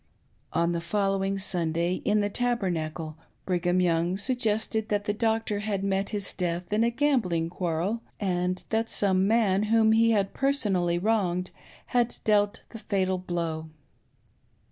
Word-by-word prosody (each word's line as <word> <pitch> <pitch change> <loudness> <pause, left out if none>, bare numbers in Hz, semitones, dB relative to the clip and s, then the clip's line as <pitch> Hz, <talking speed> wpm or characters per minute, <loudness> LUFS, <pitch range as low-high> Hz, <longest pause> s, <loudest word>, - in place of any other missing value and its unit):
On 170 +1 +1
the 170 -1 -2
fol 195 +3 0
lowing 195 0 -1
Sunday, 175 -2 -1
in 210 0 +2
the 205 - 0
Tabernacle, 170 -10 -1 0.3
Brigham 180 0 +1
Young 175 +1 +1
suggested 220 -1 -1
that 205 -1 0
the 205 - 0
doctor 220 -1 0
had 205 -2 -2
met 195 0 0
his 205 -2 -3
death 175 +1 -3
in 215 +2 +3
a 235 - +3
gambling 230 - +1
quarrel, 180 +6 -1 0.2
and 180 -2 -1
that 225 +1 +1
some 190 -1 +2
man 210 -3 +3
whom 225 -1 +5
he 225 +1 +4
had 200 -3 +1
personally 205 -11 +1
wronged 185 -3 0 0.4
had 245 -1 +2
dealt 205 0 +2
the 225 - -9
fatal 190 -3 0
blow. 165 -3 -3
195 Hz, 145 wpm, -27 LUFS, 175-220 Hz, 0.4 s, whom